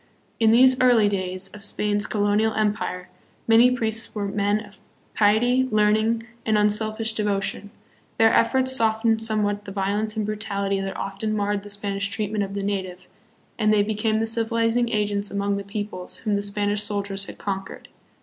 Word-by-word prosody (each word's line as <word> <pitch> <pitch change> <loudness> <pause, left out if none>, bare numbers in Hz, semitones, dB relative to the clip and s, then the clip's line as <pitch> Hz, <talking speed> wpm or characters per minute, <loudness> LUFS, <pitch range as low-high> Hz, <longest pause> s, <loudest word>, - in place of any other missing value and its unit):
In 225 -1 +4
these 255 +3 +5
early 240 -4 +5
days 185 -1 -3
of 210 - -12
Spain's 205 +1 -1
colonial 210 +1 +1
empire 205 -4 -2 0.4
many 230 +2 +6
priests 225 -3 -2
were 205 -1 -2
men 205 +1 0
of 200 -1 -17 0.3
piety, 245 +5 +3
learning, 215 +2 +2 0.2
and 220 -1 +1
un 210 0 +3
selfish 220 +1 -1
devotion. 205 -1 -2 0.5
Their 225 0 +4
efforts 260 +3 +3
softened 225 -1 +2
somewhat 210 -2 0
the 195 - -7
vio 195 +1 -1
lence 215 +1 -3
and 215 - -1
brutality 200 -2 -2
that 195 0 -5
often 195 +2 -3
marred 205 -1 -1
the 205 - -11
Spanish 200 -1 -2
treatment 210 -1 -2
of 195 0 -6
the 200 - -3
native, 185 -2 -4 0.5
and 215 -1 +3
they 210 -1 +4
became 215 +1 0
the 225 - 0
civilizing 230 +1 +1
agents 205 -2 -1
among 200 0 -1
the 200 - -5
peoples 200 -3 -6
whom 210 -1 +1
the 200 - 0
Spanish 205 0 -1
soldiers 200 -1 -2
had - - -10
conquered. 195 -1 -5
210 Hz, 170 wpm, -23 LUFS, 200-220 Hz, 0.5 s, many